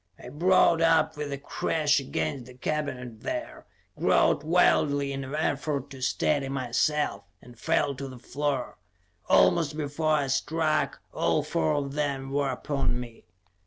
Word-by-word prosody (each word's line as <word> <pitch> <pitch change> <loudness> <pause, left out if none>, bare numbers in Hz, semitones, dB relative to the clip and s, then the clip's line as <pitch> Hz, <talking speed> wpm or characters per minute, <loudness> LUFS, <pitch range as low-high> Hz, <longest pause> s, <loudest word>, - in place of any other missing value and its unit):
I - - -10
brought 170 +2 +3
up 165 -1 +3
with 150 -1 -4
a 140 - -3
crash 150 +1 0
against 140 -1 -3
the 125 - -13
cabinet 125 -4 -4
there, 310 -1 -5 0.3
groped - - +3
wildly 145 -4 +3
in 135 0 -4
an 135 +3 -5
effort 145 -2 -1
to 135 -1 -10
steady 135 +2 0
myself, 135 -3 0
and 125 0 -15
fell 145 -2 +1
to 135 +1 -6
the 130 -1 -9
floor. 140 +1 -3 0.5
Almost 160 -4 +4
before 155 +1 0
I 145 -2 +2
struck, 155 +4 0
all - - +1
four 80 -1 0
of 140 -1 -2
them 140 -2 -2
were 140 0 0
upon 135 -1 -1
me. 120 -2 -10
145 Hz, 150 wpm, -27 LUFS, 130-155 Hz, 0.5 s, Almost